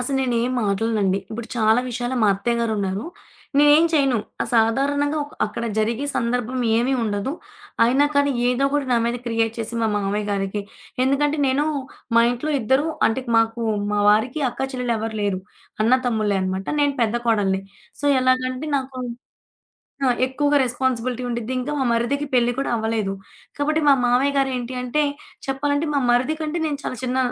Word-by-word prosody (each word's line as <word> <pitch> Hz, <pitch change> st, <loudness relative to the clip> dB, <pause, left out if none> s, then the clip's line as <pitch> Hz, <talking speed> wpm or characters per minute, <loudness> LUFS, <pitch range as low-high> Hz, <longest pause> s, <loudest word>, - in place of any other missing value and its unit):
అసలు 270 Hz, +2 st, -1 dB
నేనేం 245 Hz, 0 st, 0 dB
మాట్లాడనండి. 200 Hz, -1 st, +1 dB
ఇప్పుడు 225 Hz, +1 st, -6 dB
చాలా 220 Hz, +1 st, +4 dB
విషయాల్లో 245 Hz, +1 st, -3 dB
మా 210 Hz, -, +5 dB
అత్తయ్య 235 Hz, +4 st, -1 dB
గారు 230 Hz, -1 st, 0 dB
ఉన్నారు. 195 Hz, +2 st, -2 dB, 0.5 s
నేనేం 295 Hz, +2 st, +6 dB
చేయను. 275 Hz, -6 st, +3 dB, 0.2 s
ఆ -, -, -1 dB
సాధారణంగా 280 Hz, +6 st, +2 dB
ఒక్ 290 Hz, -, -15 dB
అక్కడ 235 Hz, +2 st, -5 dB
జరిగే 230 Hz, +5 st, 0 dB
సందర్భం 245 Hz, +2 st, -1 dB, 0.2 s
ఏమీ 245 Hz, +4 st, +1 dB
ఉండదు. 205 Hz, +5 st, -2 dB, 0.5 s
అయినా 265 Hz, +5 st, +4 dB
కానీ 285 Hz, 0 st, +3 dB, 0.2 s
ఏదో 250 Hz, +2 st, +1 dB
కూడా 285 Hz, -2 st, 0 dB
నా 240 Hz, -, +4 dB
మీద 235 Hz, -, -1 dB
క్రియేట్ 225 Hz, -1 st, 0 dB
చేసి, 225 Hz, +1 st, -4 dB
మా -, -, +3 dB
మామయ్య 205 Hz, +1 st, -1 dB
గారికి 200 Hz, +1 st, -1 dB, 0.4 s
ఎందుకంటే, 290 Hz, +3 st, +1 dB
నేను 265 Hz, +3 st, +2 dB, 0.5 s
మా 230 Hz, -, +7 dB
ఇంట్లో 250 Hz, +6 st, -2 dB
ఇద్దరూ 265 Hz, +7 st, +2 dB, 0.2 s
అంటే 255 Hz, +4 st, -1 dB
మాకు 225 Hz, +1 st, +2 dB, 0.3 s
మా 210 Hz, -, +1 dB
వారికి 245 Hz, +8 st, +1 dB
అక్కా-చెల్లెలు 250 Hz, -2 st, -2 dB
ఎవ్వరు 220 Hz, 0 st, -4 dB
లేరు. 195 Hz, -2 st, -1 dB, 0.4 s
అన్న-తమ్ముళ్ళే 225 Hz, -4 st, +2 dB
అనమాట. 190 Hz, +1 st, -3 dB
నేను 285 Hz, -1 st, +2 dB
పెద్ద 230 Hz, +1 st, +1 dB
కోడలిని. 200 Hz, -4 st, +2 dB, 0.4 s
సో, 290 Hz, -, -1 dB
ఎలాగంటే 255 Hz, +2 st, 0 dB
నాకు 260 Hz, -1 st, -7 dB, 1.1 s
ఆ! -, -, +4 dB, 0.2 s
ఎక్కువగా 290 Hz, +2 st, +1 dB
రెస్పాన్సిబిలిటీ 250 Hz, 0 st, -1 dB
ఉండిద్ది. 235 Hz, 0 st, -3 dB
ఇంకా 255 Hz, +4 st, -3 dB
మా 265 Hz, -, 0 dB
మరిదికి 240 Hz, +5 st, 0 dB
పెళ్లి 240 Hz, 0 st, +3 dB
కూడా 275 Hz, -, -1 dB
అవ్వలేదు. 220 Hz, -3 st, -1 dB, 0.4 s
కాబట్టి, 305 Hz, +2 st, +1 dB
మా -, -, +8 dB
మామయ్య 265 Hz, +4 st, +2 dB
గారు 270 Hz, -1 st, +2 dB
ఏంటి 245 Hz, +1 st, -5 dB
అంటే 275 Hz, +5 st, +1 dB, 0.4 s
చెప్పాలంటే 285 Hz, +3 st, 0 dB
మా -, -, +3 dB
మరిది 250 Hz, +5 st, +2 dB
కంటే 310 Hz, +2 st, -2 dB
నేను 290 Hz, -2 st, -2 dB
చాలా 255 Hz, -, -4 dB
చిన్న 255 Hz, +1 st, -1 dB
245 Hz, 165 wpm, -22 LUFS, 225-275 Hz, 1.1 s, మా